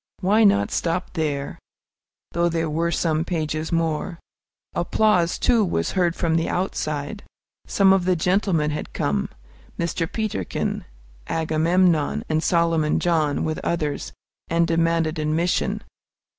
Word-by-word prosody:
Why 205 +4 +4
not 100 - +4
stop 175 +2 -1
there, 145 -4 -2 0.7
though 170 +1 +1
there 165 -2 -1
were 165 +2 0
some 160 -2 0
pages 155 -2 -2
more? 165 +1 -1 0.6
Applause, 175 -1 +2
too, 235 -3 +3
was 85 - -1
heard 175 -3 +1
from 165 -2 +1
the 165 - 0
outside. 165 0 -2 0.5
Some 195 -1 +4
of 190 -2 +2
the 185 0 +3
gentlemen 175 -3 +1
had 150 - -5
come, 70 -2 -1 0.5
Mr. 170 -1 -2
Peterkin, 215 - -2 0.4
Agamemnon, 160 0 +2
and 155 0 +1
Solomon 165 -3 +2
John, 155 -4 +1
with 155 0 -2
others, 155 -4 -2 0.4
and 170 0 +3
demanded 165 -1 +1
admission. 155 +3 0
165 Hz, 125 wpm, -23 LUFS, 155-180 Hz, 0.7 s, Why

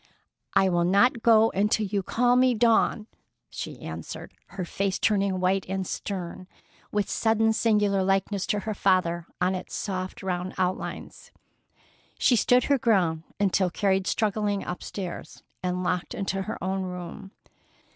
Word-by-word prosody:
"I 195 - +5
will 175 -2 +2
not 200 +7 +3
go 225 -1 +5
until 210 +2 +1
you 200 0 -1
call 245 +5 +2
me 255 -1 +4
Dawn," 225 -1 +3 0.5
she - - -6
answered, - - -7
her 190 -2 -5
face 195 +2 -1
turning 200 -3 +1
white 185 +1 +1
and 190 0 -2
stern, 185 -1 -5 0.4
with 205 -2 0
sudden 225 0 +2
singular 210 -3 +2
likeness 195 +1 0
to 210 - 0
her 215 +2 -3
father 180 -4 +1
on 180 +1 +2
its 185 -1 -5
soft 185 -2 -4
round 180 0 -3
outlines. 185 0 -3 0.9
She 250 - +4
stood 250 +2 +4
her 280 -2 +2
ground 180 -9 +2 0.2
until 195 -2 +2
carried 190 +1 0
struggling 210 -2 0
upstairs 180 0 -6 0.2
and 180 0 -2
locked 180 -1 -2
into 195 0 -2
her 190 - -4
own 190 +1 -1
room. 180 +1 -7
195 Hz, 145 wpm, -26 LUFS, 185-215 Hz, 0.9 s, I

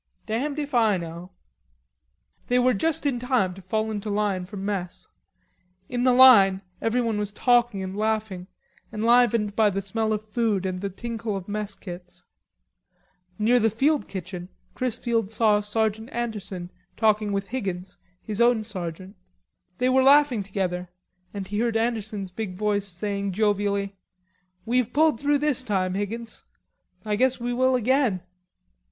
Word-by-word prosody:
"Damned 270 +7 -2
if 290 -2 -4
I 220 -5 +3
know." 170 +1 -7 1.2
They 245 - +2
were 250 0 +4
just 305 +10 -1
in 265 -4 0
time 245 -7 +1
to 195 - -12
fall 215 +4 -2
into 210 0 -4
line 200 -3 0
for 205 +2 -8
mess. 195 -2 -4 0.8
In 245 -1 -2
the 255 - +5
line 210 -7 +7 0.2
everyone 225 -2 0
was 205 -1 -2
talking 240 -2 +2
and 190 +1 -5
laughing, 215 -4 -2 0.4
enlivened 230 -1 +3
by 220 -2 +4
the 195 0 -2
smell 220 +3 -2
of 215 0 -2
food 210 -3 0
and 185 -1 -3
the 200 - -2
tinkle 225 +1 -4
of 185 - -8
mess 210 -1 -3
kits. 180 -1 -10 1.1
Near 235 +4 +3
the 225 -1 +3
field 280 +7 +1
kitchen 180 -1 -7 0.2
Chrisfield 235 -3 -1
saw 215 -1 +3
Sergeant 220 +2 -1
Anderson 200 -6 -4 0.3
talking 215 -1 +2
with 195 0 -2
Higgins, 190 -7 -5 0.2
his 215 +1 -3
own 235 -2 +4
sergeant. 185 -1 -6 0.6
They 250 +1 +1
were 260 +1 +4
laughing 275 -4 +5
together, 185 -2 -3 0.4
and 200 -2 -5
he 205 +2 -3
heard 230 -1 +1
Anderson's 215 -4 -2
big 190 -1 -5
voice 205 0 0
saying 200 +1 -3
jovially, 200 -1 0 0.7
"We've 245 0 +1
pulled 305 -5 +3
through 290 0 +2
this 285 -3 0
time, 190 -5 0
Higgins.... 220 +4 -5 0.6
I 210 -1 0
guess 255 +3 +2
we 245 +1 -2
will 260 +1 +3
again." 250 -5 +2
215 Hz, 150 wpm, -25 LUFS, 195-240 Hz, 1.2 s, line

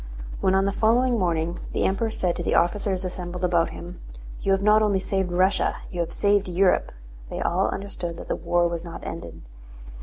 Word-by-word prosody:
When 190 0 +2
on 195 0 +3
the 200 - +1
following 235 +3 +2
morning 170 -2 0
the - - 0
Emperor 210 +4 +1
said 180 -5 -1
to - - -3
the - - 0
officers 190 +1 +1
assembled 180 0 -5
about 170 -2 +2
him: 175 +1 -9 0.4
"You 195 - +1
have 195 +1 +2
not 210 +1 +5
only 205 -2 +3
saved 190 -1 -1
Russia, 185 +2 +2 0.2
you 175 - -5
have 170 - -1
saved 205 -1 +2
Europe!" 180 +1 +2 0.4
they - - -5
all 185 +3 +1
understood 180 -4 -5
that - - -9
the - - -1
war 175 0 +1
was 170 -1 -4
not 170 -1 -8
ended. 85 - -7
185 Hz, 195 wpm, -25 LUFS, 175-200 Hz, 0.4 s, not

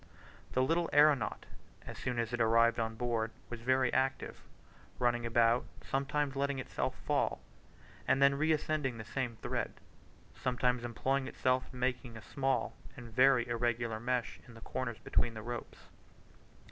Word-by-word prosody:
The 130 - +3
little 165 +4 +1
aeronaut 145 -1 +4 0.4
as - - -7
soon 125 -1 -3
as 115 0 -1
it 120 - 0
arrived 115 +1 +4
on 115 0 -1
board 115 -1 -1 0.2
was 120 -1 -6
very 130 +1 +2
active, 130 +1 -1 0.6
running 120 -1 +1
about, 115 +1 +3 0.2
sometimes 140 +1 -1
letting 140 0 0
itself 130 - -3
fall, - - +1 0.7
and 130 - +3
then 140 0 +6
reascending 155 -3 0
the 110 - -7
same 125 0 -3
thread; - - -2 0.6
sometimes 125 -1 0
employing 130 +3 -1
itself 130 0 +1
in 130 - -10
making 125 -2 -2
a 110 - -11
small 135 -1 -1 0.2
and 120 -3 -10
very 130 0 +5
irregular 120 -1 -1
mesh 125 0 -2
in 115 - -13
the 115 - -12
corners 125 -2 -4
between 115 -2 0
the 110 - -6
ropes. 120 +1 -6
125 Hz, 150 wpm, -33 LUFS, 115-135 Hz, 0.7 s, then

